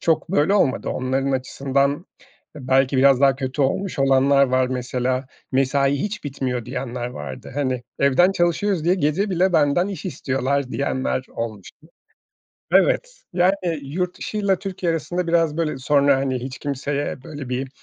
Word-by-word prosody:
çok 165 +1 +1
böyle 190 +2 +3
olmadı. 135 -10 +1
Onların 135 +2 -1
açısından 140 +4 0 0.5
belki 130 0 +2
biraz 135 0 +5
daha 135 -2 +4
kötü 130 +1 -2
olmuş 185 +6 -1
olanlar 135 +1 +4
var. 130 0 +2
Mesela, 125 +1 -2 0.3
mesai 135 +1 +2
hiç 210 -2 -4
bitmiyor 130 -4 -3
diyenler 125 -1 -4
vardı. 125 - -8
Hani, 130 -4 -1 0.2
evden 140 +7 +4
çalışıyoruz 175 0 0
diye 175 - +4
gece 190 +4 0
bile 185 +1 +2
benden 160 +4 +3
iş 195 -4 -6
istiyorlar 135 -4 -1
diyenler 130 -1 -1
olmuştu. 115 - -7 0.8
Evet, - - +2
yani, 185 +2 +3 0.3
yurt 175 +6 -3
dışıyla 200 -3 0
Türkiye 185 -3 -2
arasında 175 +3 -2
biraz 165 -2 +2
böyle 155 -5 -1
sonra, 140 0 +3
hani, 135 -1 -1
hiç 130 0 -7
kimseye 140 -1 -3
böyle 145 -5 -7
bir, 130 +1 -2
140 Hz, 145 wpm, -22 LUFS, 130-170 Hz, 0.8 s, biraz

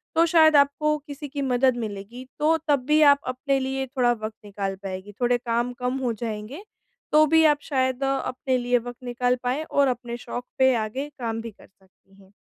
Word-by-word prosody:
तो 330 +1 +5
शायद 315 -2 +5
आपको 300 +2 +3
किसी 290 +1 -7
की 280 0 -5
मदद 255 -1 +2
मिलेगी। 220 +2 -6
तो 320 +2 +3
तब 285 -2 +3
भी 305 +1 +4
आप 280 - +2
अपने 270 +2 -1
लिए 265 0 -2
थोड़ा 245 -2 +1
वक़्त 215 -1 -6
निकाल 195 -1 -4
पाएँगी। 190 +1 -6
थोड़े 245 0 +3
काम 240 +1 -1
कम 250 +1 -1
हो 250 -3 -1
जाएँगे 225 - -6 0.5
तो 305 +1 +6
भी 320 +1 +4
आप 290 - -8
शायद 260 -2 -1
अ, 270 - +1 0.2
अपने 255 0 -1
लिए 245 0 +1
वक़्त 245 +1 -10
निकाल 245 +1 0
पाएँ 255 +5 -1
और 280 -3 +2
अपने 240 -1 -3
शौक 245 +1 -6
पे 260 0 +5
आगे 235 +6 -3
काम 225 -1 -3
भी 230 - -7
कर - - -19
सकती 195 0 -29
हैं। 190 - -23
250 Hz, 200 wpm, -24 LUFS, 230-280 Hz, 0.5 s, तो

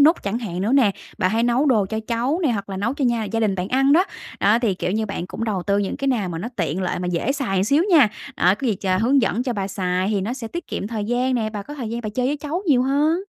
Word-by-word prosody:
núc 315 +4 +5
chẳng 205 +4 -2
hạn 185 -6 -4
nữa 215 +5 0
nè, 260 -7 +5 0.3
bà 185 -2 +2
hay 225 +3 +1
nấu 245 +4 +2
đồ 220 -8 +3
cho 220 +2 -3
cháu 245 +7 0
nè 295 - +3
hoặc 200 -2 -4
là 190 - -5
nấu 230 +7 -1
cho 280 -2 -1
nhà 235 -3 +1
gia 225 +2 -2
đình 205 -3 +1
bạn 185 +1 -3
ăn 270 +2 +3
đó, 355 +5 +5 0.4
đó 210 +3 +4
thì, 225 -6 +1
kiểu 180 - -2
như, 220 0 0
bạn 180 -3 -4
cũng 230 - -5
đầu 200 -5 -1
tư 200 +1 +1
những 200 - -1
cái 275 - -1
nào 220 -8 0
mà 165 -1 -4
nó 220 +7 -4
tiện 170 +1 -1
lợi 180 - -1
mà 180 - -2
dễ 180 +10 0
xài 195 -10 0
xíu 285 - +3
nha, 290 -10 +7 0.3
ờ, 180 +3 +4
có 265 - -4
gì 220 - +2
ch 195 - -7
hướng 260 +4 +3
dẫn 230 +3 +1
cho 250 -2 -2
bà 195 -2 -3
xài 185 -1 -1
thì 200 -2 +1
nó 215 +6 -2
sẽ 240 -4 -6
tiết 345 +5 -6
kiệm - - -4
thời 215 -1 -3
gian 250 +3 0
nè, 220 -3 -1
bà 210 -2 -5
có 295 - -9
thời 245 -6 -5
gian 235 - -3
bà 220 - -4
chơi 250 +4 -1
với 290 - 0
cháu 310 +6 -4
nhiều 260 -6 +4
hơn. 295 +5 +2
225 Hz, 310 wpm, -22 LUFS, 200-265 Hz, 0.4 s, nha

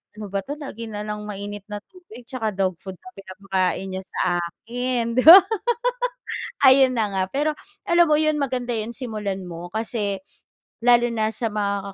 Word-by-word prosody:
"Ano 210 -1 -8
ba 195 0 -2
'to, 285 - -4
lagi 230 -6 -7
na 210 0 -5
lang 210 0 -5
mainit 205 0 -6
na 205 0 -5
tubig 355 - -14
tsaka 225 -5 -2
dog 190 -2 -1
food 190 - -7
na - - -12
pinapakain 190 -1 -2
niya 190 - -6
sa 175 -1 -1
akin." 235 +6 -3
'Di 255 - +4
ba? 340 +5 +13 1.3
Ayun 260 -1 +5
na 220 -2 +2
nga. 190 -1 0
Pero 295 +3 +1 0.4
alam 345 0 +5
mo 305 - +4
'yun, 310 0 +1
maganda 255 -3 -2
yung 220 +2 -4
simulan 210 -6 -4
mo. 175 -1 -7
Kasi 220 -3 -1 0.6
lalo 240 0 +4
na 220 -1 0
sa 230 -3 -1
mga 200 -1 -2
215 Hz, 175 wpm, -23 LUFS, 195-250 Hz, 1.3 s, ba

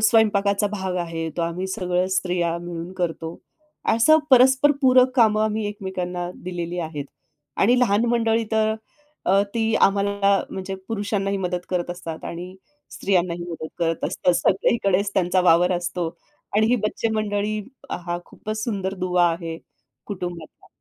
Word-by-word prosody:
स्वयंपाकाचा 210 -2 +3
भाग 190 -3 -2
आहे, 165 -2 -3
तो 170 - 0
आम्ही 170 +3 -2
सगळं 180 -1 0
स्त्रिया 175 -2 0
मिळून 175 +1 -6
करतो. 165 -2 -3 0.6
असं 310 +8 +6
परस्पर 265 +3 +6
पूरक 255 0 +6
कामं 215 -3 +4
आम्ही 215 0 -1
एकमेकांना 180 -3 -4
दिलेली 175 -1 -4
आहेत. 155 -4 -4 0.5
आणि 245 +5 +4
लहान 225 -1 +3
मंडळी 230 -1 +2
तर 220 0 +2 0.5
अ, 195 +1 +5
ती 225 -1 +1
आम्हाला 200 0 +3
म्हणजे 190 0 -5
पुरुषांनाही 200 -2 -1
मदत 180 -2 -2
करत 180 -2 -1
असतात 165 -2 -7
आणि 180 +2 -6 0.4
स्त्रियांनाही 175 -3 0
मदत 160 -1 -6
करत 165 -1 0
असतात. 180 - +1
सगळीकडेच 200 0 +2
त्यांचा 185 0 +2
वावर 175 +1 +5
असतो. 175 0 -3 0.5
आणि 220 - +4
ही 245 +2 +3
बच्चे 220 +1 0
मंडळी 210 0 -1 0.3
हा 175 0 -3
खूपच 215 0 -6
सुंदर 195 -4 -2
दुवा 180 -1 +2
आहे 165 -1 -4 0.5
कुटुंबातला. 175 -5 -7
190 Hz, 140 wpm, -23 LUFS, 175-215 Hz, 0.6 s, असं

